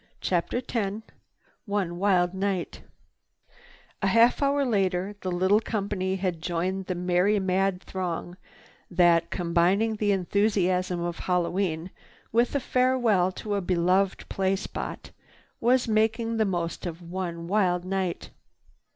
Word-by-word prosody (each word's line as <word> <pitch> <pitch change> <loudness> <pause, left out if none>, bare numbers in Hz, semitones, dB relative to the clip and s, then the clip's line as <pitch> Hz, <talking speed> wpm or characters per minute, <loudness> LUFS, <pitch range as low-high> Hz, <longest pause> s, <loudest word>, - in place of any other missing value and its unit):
CHAPTER 185 +8 -1
X 215 -2 -2 0.6
ONE 190 -4 -2
WILD 180 -2 +2
NIGHT 190 -2 -2 1.2
A 195 - +1
half 230 +7 +4
hour 280 0 +2
later 195 -3 0
the 185 - -3
little 185 +4 +3
company 200 -4 -2
had 180 -4 -2
joined 180 +3 -2
the 185 - -2
merry 180 +4 +2
mad 190 0 0
throng 175 -1 -4 0.5
that, 170 -2 +3
combining 180 +5 +1
the 205 -1 +1
enthusiasm 185 -2 +1
of 170 0 -3
Hallowe'en 180 -1 -1 0.4
with 235 +4 +2
a - - +3
farewell 245 -8 +2
to 210 +1 -4
a 200 - 0
beloved 185 +2 +1
play 190 0 0
spot, 195 - -6 0.5
was 245 +1 +3
making 225 +1 +1
the 220 - +3
most 175 -2 -2
of 170 +1 -7
one 170 -1 -5
wild 180 -3 +1
night. 185 -2 -3
190 Hz, 125 wpm, -26 LUFS, 180-210 Hz, 1.2 s, half